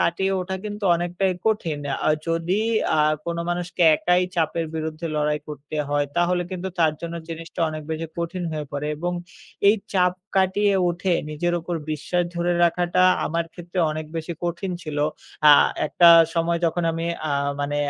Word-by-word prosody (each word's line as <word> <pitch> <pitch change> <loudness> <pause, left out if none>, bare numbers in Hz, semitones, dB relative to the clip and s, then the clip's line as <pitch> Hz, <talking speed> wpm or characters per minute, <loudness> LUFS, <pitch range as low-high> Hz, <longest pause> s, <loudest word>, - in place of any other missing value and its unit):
কাটিয়ে 190 +3 +1
ওঠা 185 +1 -4
কিন্তু 210 0 -5
অনেকটাই 175 +2 0
কঠিন। 175 -9 0 0.3
আর 155 - +4
যদি, 165 +4 0 0.4
আ - - +2 0.3
কোন 170 0 -3
মানুষকে 175 0 -2
একাই 180 +3 +2
চাপের 165 0 0
বিরুদ্ধে 160 +1 -4
লড়াই 150 0 +1
করতে 150 0 -8
হয় 145 0 +1
তাহলে 175 +1 +2
কিন্তু 185 0 -4
তার 160 -2 +4
জন্য 170 0 -5
জিনিসটা 165 +1 -7
অনেক 155 0 -6
বেশি 160 +1 -3
কঠিন 170 +2 -3
হয়ে 150 -1 -4
পড়ে, 145 +1 -3
এবং 175 +3 -2 0.6
এই 210 - +7 0.2
চাপ 180 -2 +3 0.2
কাটিয়ে 195 +2 +3 0.2
উঠে 180 +1 -1 0.2
নিজের 175 +3 -1
উপর 175 +1 -4 0.2
বিশ্বাস 165 +4 -1
ধরে 175 +1 +1
রাখাটা 175 +1 +2 0.2
আমার 170 +1 -1
ক্ষেত্রে 175 +1 -7
অনেক 155 0 -4
বেশি 165 +1 -4
কঠিন 175 +2 -2
ছিল। 150 -2 -4 0.5
আ - - +11 0.3
একটা 170 +3 +5 0.3
সময় 170 0 +1
যখন 170 +1 -1
আমি, 165 +1 -3 0.2
আ - - -2 0.3
মানে, 145 +1 -1
170 Hz, 165 wpm, -23 LUFS, 160-180 Hz, 0.6 s, আ